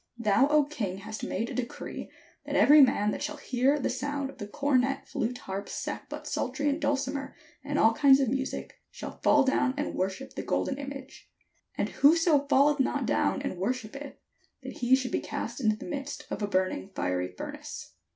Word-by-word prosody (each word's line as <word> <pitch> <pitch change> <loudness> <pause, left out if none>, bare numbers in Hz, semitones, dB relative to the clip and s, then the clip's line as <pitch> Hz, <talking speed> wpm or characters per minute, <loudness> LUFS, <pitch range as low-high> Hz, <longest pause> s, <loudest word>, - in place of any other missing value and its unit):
Thou, 225 +3 +3
O 300 0 +4
king, 210 -11 -4
hast 215 +2 -7
made 230 - -2
a - - -5
decree, 250 -2 -5 0.4
that - - -2
every 295 +1 +8
man 210 -6 +4
that - - -4
shall 300 - -3
hear 265 +1 +1
the 280 - -1
sound 280 0 -3
of - - -20
the 205 - -5
cornet, 270 +3 0
flute, 245 +3 -2
harp, 195 -2 -6
sackbut, - - -5
psaltery, 290 0 -1
and 290 +3 -1
dulcimer, 275 -1 -1 0.3
and 290 +1 -2
all 225 -4 +5
kinds 275 0 +6
of 270 - +2
music, 265 +3 -3
shall - - -9
fall 290 -1 +5
down 265 0 +1
and 290 - -2
wor 185 +1 0
ship 265 +8 -10
the - - -4
golden 270 - -1
image: 275 -1 -8 0.5
and - - 0
whoso 300 -1 +4
falleth 285 +1 +4
not 265 - +1
down - - +1
and 180 - -4
worshippeth, 255 +6 -4 0.5
that - - -8
he 250 +1 +5
should 255 -2 -2
be - - +1
cast 235 +4 -5
into 215 -3 +3
the - - -9
midst 280 -1 -5
of - - -3
a 205 - 0
burning 185 - -1
fiery 90 0 -1
furnace. - - -7
265 Hz, 190 wpm, -28 LUFS, 220-285 Hz, 0.5 s, every